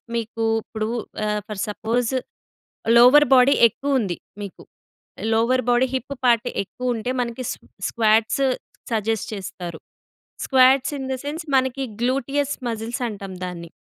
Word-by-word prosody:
మీకు 230 0 -3 0.2
ఇప్పుడు 220 -1 -4 0.4
ఆహ్, 210 0 -1
ఫర్ 210 -2 -6
సపోజ్ 230 +4 -1 0.8
లోవర్ 255 +5 +8
బాడీ 255 +2 +6
ఎక్కువ 275 +4 -1
ఉంది 185 -6 -2 0.3
మీకు. 195 - -9 0.7
లోవర్ 250 +3 +2
బాడీ 245 +2 +4
హిప్ 260 +2 -3
పార్ట్ 240 0 +3 0.2
ఎక్కువ 250 +5 -3
ఉంటే 225 +3 -3
మనకి 240 +1 -4
స్ - - -4 0.3
స్క్వాట్స్ 220 +3 +2 0.5
సజెస్ట్ 220 -1 -1
చేస్తారు. 180 -4 -6 0.7
స్క్వాట్స్ 265 +1 +4
ఇన్ 265 -1 -5
ది 260 - -1
సెన్స్ 310 +3 -4
మనకి 260 +1 +1 0.2
గ్లూటియస్ 275 +3 0
మజిల్స్ 230 +3 -4
అంటాం 200 -3 -7
దాన్ని. 170 -2 -7
235 Hz, 130 wpm, -22 LUFS, 215-260 Hz, 0.8 s, లోవర్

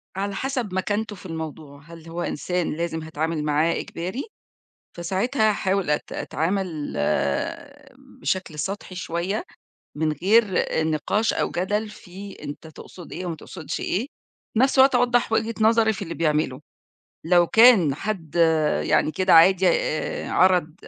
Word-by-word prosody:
على 200 +1 -3
حسب 250 -4 -3
مكانته 205 +3 -2
في 185 - -15
الموضوع، 155 -4 -7
هل 165 +1 -13
هو 170 +1 -5
إنسان 180 +1 -2
لازم 165 0 -3
هاتعامل 160 0 -3
معاه 150 +3 +2
إجباري؟ 185 +11 -5 0.7
فساعتها 215 +7 +1
هاحاول 195 -3 0
أت 150 - -1
أتعامل 165 -2 -2 1.3
بشكل 180 -5 -2
سطحي 190 +3 -5
شوية، 180 - -3 0.5
من 155 0 0
غير 200 +10 +4 0.4
النقاش 160 +8 0
أو - - -1
جدل 205 +4 -1
في 200 -1 -11
أنت 145 +2 -8
تقصد 160 +2 -12
إيه 180 +1 -5
وما 170 -2 -4
تقصدش 160 0 -7
إيه؟ 220 +8 -1 0.5
في - - 0
نفس 265 +1 +3
الوقت 265 0 +6
أوضح 245 -1 +2
وجهة 225 +1 0
نظري 220 0 +4
في 205 - -6
اللي 170 -3 -5
بيعمله، 150 -5 0 0.6
لو 175 +1 +4
كان 220 - +6
حد 170 -3 -5 0.5
يعني - - +2
كده 185 +1 +3
عادي 185 +3 +6
آآ، 155 -2 -1
عرض 180 -4 +3
180 Hz, 140 wpm, -23 LUFS, 160-210 Hz, 1.3 s, الوقت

